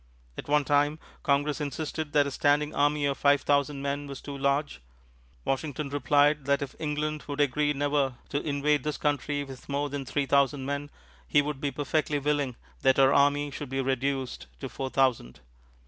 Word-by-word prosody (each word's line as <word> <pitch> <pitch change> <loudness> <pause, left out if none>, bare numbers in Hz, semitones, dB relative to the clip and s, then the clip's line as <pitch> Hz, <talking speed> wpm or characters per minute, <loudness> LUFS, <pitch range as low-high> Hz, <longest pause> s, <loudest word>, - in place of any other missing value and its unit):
At - - -7
one 145 0 +3
time, 145 +2 +2 0.2
Congress 145 +2 +1
insisted 150 +1 -3
that 145 -1 +5
a 140 - -3
standing 145 +2 +2
army 145 0 +2
of 140 -1 -1
five 145 0 +4
thousand 140 -1 +1
men 140 +1 -2
was 140 -1 -7
too 140 - -7
large; 140 - 0 0.6
Washington 140 +1 -2
replied 145 +1 +3
that 140 +1 +2
if 140 - -7
England 150 0 -2
would 145 0 -5
agree 145 +1 +2
never 145 -2 0
to 145 - -1
invade 145 -1 +1
this 150 -1 -2
country 145 0 -1
with 135 -1 -11
more 145 +1 -1
than 140 -1 -3
three 140 +2 -1
thousand 140 0 +2
men, 140 +1 -3 0.4
he 145 - +4
would 145 -1 -4
be 145 - 0
perfectly 145 +2 -1
willing 145 -3 0 0.3
that 130 0 +4
our 135 0 +5
army 145 +1 +3
should 140 0 -6
be 135 +1 -2
reduced 135 - -1
to - - -4
four 135 -1 -4
thousand. 130 - 0
145 Hz, 180 wpm, -28 LUFS, 140-145 Hz, 0.6 s, that